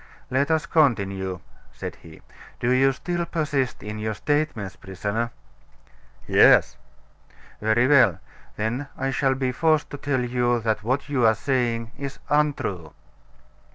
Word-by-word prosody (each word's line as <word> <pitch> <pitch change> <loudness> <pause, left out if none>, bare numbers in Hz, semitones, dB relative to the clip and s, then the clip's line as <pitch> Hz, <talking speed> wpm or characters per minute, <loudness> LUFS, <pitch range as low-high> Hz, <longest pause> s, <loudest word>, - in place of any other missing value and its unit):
"Let 140 +3 +1
us 160 0 +1
continue," 100 - +1 0.3
said - - -7
he. 80 -1 -15 0.4
"Do 120 - +1
you 135 +1 +4
still 170 +6 -3
persist 145 -6 -1
in 105 0 -6
your 110 0 -2
statements, 125 - -1
prisoner?" 100 +6 -3 1.0
"Yes." - - +5 0.9
"Very 110 +3 +3
well; 125 - +5 0.4
then 120 +6 -2
I 135 +1 -1
shall 135 0 +1
be 130 -1 -1
forced 155 +3 +1
to 145 - -5
tell 140 -2 -1
you 120 -1 +1
that 110 -1 0
what 130 +6 -1
you 140 -4 0
are 110 - +4
saying 120 -1 -1
is 140 -1 -5
untrue." 135 - 0
125 Hz, 135 wpm, -24 LUFS, 110-140 Hz, 1.0 s, Yes